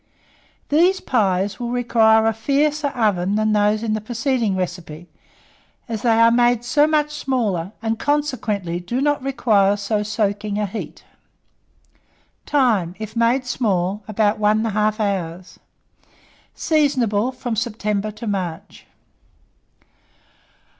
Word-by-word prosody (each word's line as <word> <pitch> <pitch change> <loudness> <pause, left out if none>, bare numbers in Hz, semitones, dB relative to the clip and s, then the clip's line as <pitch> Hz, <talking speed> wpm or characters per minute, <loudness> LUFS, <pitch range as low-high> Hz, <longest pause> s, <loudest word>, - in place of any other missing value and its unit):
These 355 +6 +3
pies 200 -4 0
will 240 -1 -3
require 225 -2 +3
a 225 - +2
fiercer 290 +6 0
oven 205 -7 0
than 215 0 +1
those 210 +1 +2
in 220 -2 -1
the 215 - -2
preceding 235 -2 -1
recipe, 175 -2 -5 0.8
as 225 -3 -4
they 230 -2 +3
are 230 0 +6
made 240 0 +3
so 295 +4 +3
much 300 -1 +1
smaller, 225 - -2
and 225 0 -1
consequently 235 - -1
do 235 +8 -3
not 290 0 +1
require 215 -7 +2
so 205 +1 -1
soaking 205 -1 -2
a 210 - 0
heat. 205 +3 -7 1.4
Time. 220 - +1
If 215 0 -7
made 235 +3 +2
small, 200 -5 -1
about 215 0 +1
1 215 +1 +2
1/2 215 0 0
hour. 185 -4 -2 1.1
Seasonable 255 -7 +1
from 250 -2 -4
September 210 -2 -2
to 215 +3 -9
March. 185 -6 -5
220 Hz, 120 wpm, -21 LUFS, 205-245 Hz, 1.4 s, are